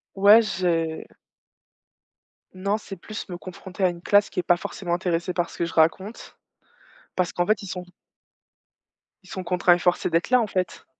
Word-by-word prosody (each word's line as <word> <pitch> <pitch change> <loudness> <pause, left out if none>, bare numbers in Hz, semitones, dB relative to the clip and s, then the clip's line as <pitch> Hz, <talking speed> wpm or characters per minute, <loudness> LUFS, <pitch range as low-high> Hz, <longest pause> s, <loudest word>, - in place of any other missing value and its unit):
Ouais, 205 +3 +7
j'ai 170 -6 -1 1.5
Non, 200 +3 -1
c'est 200 -2 -9
plus 210 +4 -8
me 175 - -5
confronter 185 +1 -7
à 185 - +5
une 170 -1 -8
classe 205 +3 +3
qui - - -4
est - - -1
pas 175 - +4
forcément 190 -2 -4
intéressée 175 0 -1
par 175 0 -1
ce - - -12
que 170 - 0
je 170 - -7
raconte. 170 +7 0 0.8
Parce 180 -2 0
qu'en 175 - 0
fait, 215 0 +1
ils 200 - -8
sont 180 0 -5 1.4
ils 185 - -18
sont 185 - -5
contraints, 180 0 +3
et 175 - +1
forcés 175 -1 +1
d'être 165 +1 +1
là, 250 0 +5
en 230 - +1
fait. 185 -3 -3
180 Hz, 185 wpm, -24 LUFS, 175-200 Hz, 1.5 s, Ouais